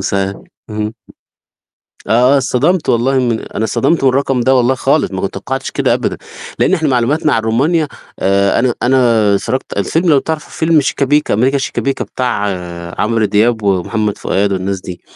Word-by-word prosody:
صحيح، 100 0 -1 0.4
اها. 105 +1 -3 1.2
آه، 125 +6 +4
اتصطدمت 150 +7 +1
والله 130 +3 +2
من 120 -3 0
أنا 110 - -4
اتصطدمت 135 +7 0
من 135 - +5
الرقم 135 -1 0
ده 130 +2 +3
والله 125 +1 +2
خالص - - +1
ما - - -4
كنت - - -3
توقعتش - - -4
كده - - +1
أبدًا، - - -2 0.4
لأن - - +2
إحنا 160 -5 +1
معلوماتنا 135 +5 +1
عن 115 - +1
رومانيا 145 +8 +1 0.3
آآ، 100 +2 +2
أنا 125 -1 +1
أنا 130 +2 +3 0.4
اتفرّجت 125 +6 -3
الفيلم 165 - 0
لو 140 -3 +5
تعرف 160 +1 -4
فيلم 160 -2 +2
شِيكا 140 0 0
بِيكا، 150 +2 +1
أمريكا 130 +6 +2
شِيكا 135 - -3
بِيكا 135 -1 -1
بتاع 120 -5 -2 0.6
عمرو 115 0 +1
دياب 110 +2 +1
ومحمد 100 +2 0
فؤاد 100 +1 0
والناس 95 0 -3
دي، 90 -1 -8
120 Hz, 170 wpm, -15 LUFS, 105-140 Hz, 1.2 s, من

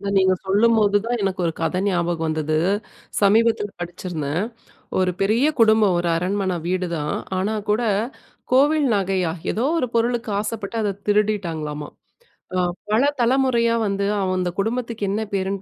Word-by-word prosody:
இத 200 - -4
நீங்க 190 0 +4
சொல்லும்போது 210 0 +3
தான் 235 -1 -1
எனக்கு 190 -1 -1
1 165 - 0
கத 165 +2 0
ஞாபகம் 175 -3 0
வந்தது. 155 -1 -1 0.6
சமீபத்துல 210 0 +3
படிச்சிருந்தேன். 175 -1 -3 0.5
ஒரு 185 -1 +2
பெரிய 220 +8 +3
குடும்பம் 215 -4 +5
ஒரு 175 0 0
அரண்மன 190 +2 -1
வீடுதான் 170 -4 -1 0.2
ஆனா 200 +4 0 0.2
கூட 220 +3 +2 0.7
கோவில் 290 +3 +4
நகையா 190 -3 0 0.2
ஏதோ 230 - -1
ஒரு 255 - +1
பொருளுக்கு 235 0 0
ஆசப்பட்டு 215 0 -4
அத 205 - 0
திருடிட்டாங்களாமா, 170 -8 -1 0.7
அ 185 - +1 0.3
பல 215 +3 +3 0.2
தலைமுறையா 235 -2 +3
வந்து 200 0 -1 0.2
அவந்து 185 -1 0
குடும்பத்துக்கு 230 -1 -2
என்ன 210 +2 -1
பேருன்னு 195 0 -1
200 Hz, 135 wpm, -22 LUFS, 180-225 Hz, 0.7 s, குடும்பம்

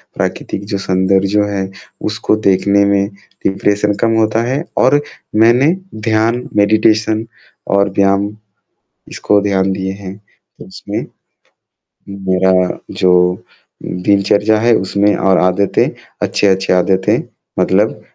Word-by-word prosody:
प्राकृतिक 100 - -3
जो - - +1
सौन्दर्य 95 0 +1
जो 105 +1 +1
है 95 -1 -3 0.4
उसको - - 0
देखने 100 +1 +3
में 100 0 +1 0.4
डिप्रेशन 105 +1 0
कम 115 -1 +2
होता 110 +1 +1
है 135 +6 -2
और 145 +3 +4 0.4
मैंने 125 +8 +4 0.2
ध्यान, 110 +2 0
मेडिटेशन 110 +1 +2 0.5
और 100 0 +3
व्यायाम 100 +1 +2 0.8
इसको 105 -1 +1
ध्यान 95 -1 0
दिए 95 0 -3
हैं, 95 -1 -9
तो 105 - -19
इसमे - - -6 1.2
मेरा 95 0 +2 0.2
जो 90 0 +2 0.4
दिनचर्या 100 +3 +1
है 120 0 +3
उसमें 100 +2 +1
और 95 -1 +2
आदतें 90 +2 +1 0.3
अच्छी-अच्छी 95 -2 +1
आदतें 95 +1 +2 0.4
मतलब - - +1
100 Hz, 110 wpm, -15 LUFS, 95-110 Hz, 1.2 s, और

